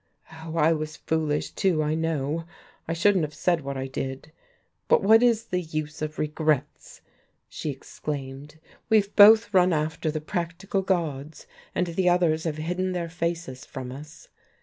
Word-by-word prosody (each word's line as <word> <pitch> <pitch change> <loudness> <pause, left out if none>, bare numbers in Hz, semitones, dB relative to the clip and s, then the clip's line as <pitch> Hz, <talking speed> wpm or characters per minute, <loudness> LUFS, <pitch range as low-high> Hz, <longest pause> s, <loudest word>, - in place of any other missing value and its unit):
Oh, 160 0 -8
I 165 +1 +4
was 155 -1 -4
foolish 155 -2 -1
too, 180 -6 +1
I 150 +1 0
know. 160 0 -1 0.4
I 165 - -1
shouldn't 185 +1 +3
have 150 0 -4
said 175 -2 +1
what 140 -1 -5
I 130 - -3
did. 135 +2 -5 0.6
But - - +4
what 220 +3 +6
is 235 -2 +3
the 180 -5 -2
use 155 -2 -5
of 155 0 -4
regrets?" 155 -1 -2 0.5
she 155 - -5
exclaimed. 140 +1 -7 0.3
"We've 210 -3 +2
both 215 +1 +7
run 180 -1 +5
after 155 +1 -1
the 155 0 -2
practical 175 +4 -3
gods, 160 -6 -2 0.3
and 180 - +1
the 180 +1 +1
others 170 -3 +2
have 155 -2 -2
hidden 180 +4 -2
their 170 -2 -3
faces 170 -6 -4
from 130 -2 -7
us. 150 +4 -11
160 Hz, 160 wpm, -26 LUFS, 150-180 Hz, 0.6 s, both